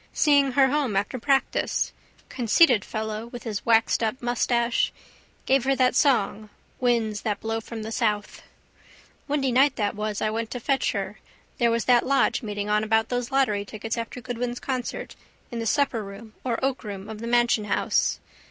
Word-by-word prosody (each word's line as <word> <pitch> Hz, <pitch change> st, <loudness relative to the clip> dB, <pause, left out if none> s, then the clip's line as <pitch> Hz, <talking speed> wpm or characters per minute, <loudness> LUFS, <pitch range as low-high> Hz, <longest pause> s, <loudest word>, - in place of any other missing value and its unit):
Seeing 280 Hz, -3 st, +3 dB
her 265 Hz, 0 st, +5 dB
home 275 Hz, -7 st, 0 dB
after 205 Hz, +6 st, -1 dB
practice. 270 Hz, +2 st, 0 dB, 0.3 s
Conceited 245 Hz, -, +4 dB
fellow 220 Hz, +1 st, -4 dB
with 240 Hz, 0 st, -9 dB
his 215 Hz, -4 st, -4 dB
waxedup 225 Hz, +1 st, +2 dB
moustache. 240 Hz, 0 st, +1 dB, 0.5 s
Gave 265 Hz, -1 st, +3 dB
her 270 Hz, 0 st, +3 dB
that 255 Hz, -1 st, +3 dB
song 220 Hz, -6 st, +2 dB, 0.3 s
Winds 230 Hz, -4 st, +1 dB
that 210 Hz, -2 st, -2 dB
blow 225 Hz, 0 st, -2 dB
from 225 Hz, 0 st, -7 dB
the 220 Hz, -, -6 dB
south. 210 Hz, -3 st, -1 dB, 0.9 s
Windy 280 Hz, -3 st, 0 dB
night 270 Hz, +3 st, +4 dB
that 205 Hz, -2 st, -1 dB
was 210 Hz, 0 st, -3 dB
I 215 Hz, -, 0 dB
went 225 Hz, 0 st, -3 dB
to 250 Hz, -, -5 dB
fetch 270 Hz, +3 st, 0 dB
her -, -, -4 dB, 0.4 s
there 235 Hz, -1 st, +4 dB
was 230 Hz, 0 st, 0 dB
that 245 Hz, -2 st, +5 dB
lodge 275 Hz, 0 st, +2 dB
meeting 205 Hz, -3 st, -4 dB
on 210 Hz, 0 st, +2 dB
about 220 Hz, +1 st, +1 dB
those 245 Hz, -1 st, -2 dB
lottery 260 Hz, -7 st, +1 dB
tickets 215 Hz, +2 st, -5 dB
after 230 Hz, +1 st, -5 dB
Goodwin's 245 Hz, +1 st, -4 dB
concert 255 Hz, -2 st, -4 dB, 0.4 s
in 235 Hz, -, -4 dB
the 230 Hz, -, -2 dB
supperroom 220 Hz, -6 st, -1 dB
or 240 Hz, -3 st, -1 dB
oakroom 210 Hz, -7 st, -4 dB
of 220 Hz, -1 st, -7 dB
the 230 Hz, -, -5 dB
Mansion 240 Hz, -2 st, +2 dB
house. 205 Hz, -, +1 dB
235 Hz, 170 wpm, -25 LUFS, 215-255 Hz, 0.9 s, her